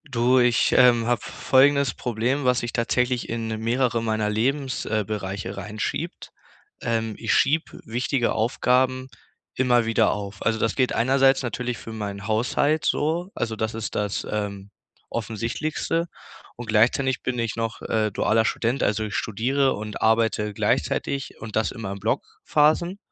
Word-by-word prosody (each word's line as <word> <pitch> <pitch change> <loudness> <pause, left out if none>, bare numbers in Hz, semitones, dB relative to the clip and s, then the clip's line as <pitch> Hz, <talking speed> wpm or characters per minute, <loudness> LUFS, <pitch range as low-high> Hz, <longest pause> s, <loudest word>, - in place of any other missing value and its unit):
Du, 125 -2 +2
ich, 120 -2 +3
ähm, 120 -2 +5
hab 120 -1 +1
folgendes 140 -1 +3
Problem, 125 +3 -1
was 125 -1 +3
sich 120 0 -4
tatsächlich 125 +1 0
in 115 -1 -3
mehrere 120 0 +1
meiner 110 -2 0
Lebens 130 +5 -1
äh, 110 -1 0
bereiche 95 -2 -4
reinschiebt. 105 +2 -4 0.5
Ähm, 115 -1 -1
ich - - 0
schieb 155 +3 +1
wichtige 120 +2 0
Aufgaben 130 +3 +1 0.5
immer 125 -2 +3
wieder 115 -2 +3
auf. 100 -1 -6
Also, 115 0 +1
das 110 0 0
geht 130 -2 +1
einerseits 135 +2 +3
natürlich 125 -1 -3
für 115 - -9
meinen 105 -2 -5
Haushalt 125 +7 +1
so, 165 +5 0
also 115 -2 -3
das 110 +1 -2
ist 110 -2 -5
das, 105 -1 -2
ähm, 100 -1 -4 0.4
offensichtlichste. 115 +9 -2 0.5
Und 120 - -7
gleichzeitig 125 +4 +2
bin 125 -1 -2
ich 115 -2 -2
noch, 115 -1 -3
äh, 110 -1 0
dualer 110 +3 +2
Student, 120 +3 0
also 105 +1 +1
ich 105 -1 -5
studiere 130 +6 +1
und 105 0 -6
arbeite 110 -1 +2
gleichzeitig 135 +6 -1
und 110 -1 -7
das 110 - +2
immer 105 -4 -5
in 100 - -7
Blockphasen. 170 - +1
115 Hz, 150 wpm, -24 LUFS, 110-130 Hz, 0.5 s, ähm